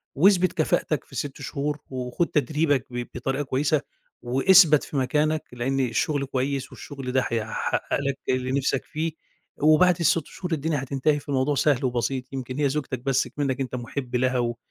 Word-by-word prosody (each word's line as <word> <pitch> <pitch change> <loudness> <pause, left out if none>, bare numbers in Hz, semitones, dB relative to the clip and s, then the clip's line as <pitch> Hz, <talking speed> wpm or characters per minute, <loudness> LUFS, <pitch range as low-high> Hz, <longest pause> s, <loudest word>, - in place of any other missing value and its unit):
واثبِت 185 +4 +4
كفاءتك 155 -1 0
في - - -14
6 145 0 -4
شهور، 145 +3 -2
وخُد 130 +5 -2
تدريبك 150 -2 +1
ب 120 -1 -4
بطريقة 135 +3 -1
كويسة 140 +2 +1 0.4
واثبَت 150 +5 +5
في 145 - -5
مكانك، 150 +4 +1
لأن 130 +3 -1
الشغل 135 +3 0
كويس 135 +1 -2
والشغل 135 -3 -7
ده 130 +1 +3
هيحقق 110 -2 -1
لك 140 -1 -1
اللي 130 0 0
نفْسَك 135 -1 0
فيه، 160 +2 -2 0.5
وبعد 155 +4 +5
ال6 165 -1 +2
شهور 180 -2 -7
الدنيا 150 -2 -1
هتنتهي، 140 +3 +1
فالموضوع 140 0 0
سهل 135 -1 +2
وبسيط، 125 +1 -2
يمكن 130 -1 -5
هي 145 -2 +3
زوجتك 135 -3 -3
بس 135 +1 +1
اكمنك 140 -2 -2
أنت 130 -1 -3
محب 125 +1 -5
لها 130 +1 +2
و 120 -1 -1
135 Hz, 165 wpm, -25 LUFS, 130-150 Hz, 0.5 s, واثبَت